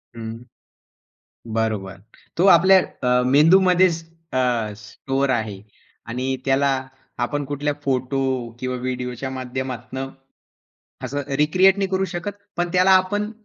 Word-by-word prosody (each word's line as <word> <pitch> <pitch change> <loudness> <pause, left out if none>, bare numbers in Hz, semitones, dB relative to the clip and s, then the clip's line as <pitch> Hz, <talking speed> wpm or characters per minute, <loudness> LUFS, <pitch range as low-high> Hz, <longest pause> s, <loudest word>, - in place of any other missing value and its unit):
हं, 115 +1 -7 1.1
बरोबर. 105 -4 -2 0.4
तो 175 - +3
आपल्या 190 +3 +6 0.3
अ, 125 0 +3
मेंदूमध्येच 175 +4 +4 0.3
अ, - - 0 0.4
स्टोअर 135 +6 -3
आहे 110 -6 -2 0.5
आणि 130 +3 -2
त्याला 135 +1 +2 0.6
आपण 145 +3 -3
कुठल्या 145 +1 -2
फोटो 135 0 -1 0.4
किंवा 130 0 -3
व्हिडिओच्या 125 0 -4
माध्यमातनं 130 0 -5 1.0
असं 145 +3 -3 0.2
रिक्रिएट 185 +6 +4
नाही 195 - 0
करू 190 0 +1
शकत. 175 +3 -3 0.3
पण 175 0 0
त्याला 185 +1 +4
आपण 190 +3 +3
135 Hz, 110 wpm, -22 LUFS, 125-175 Hz, 1.1 s, आपल्या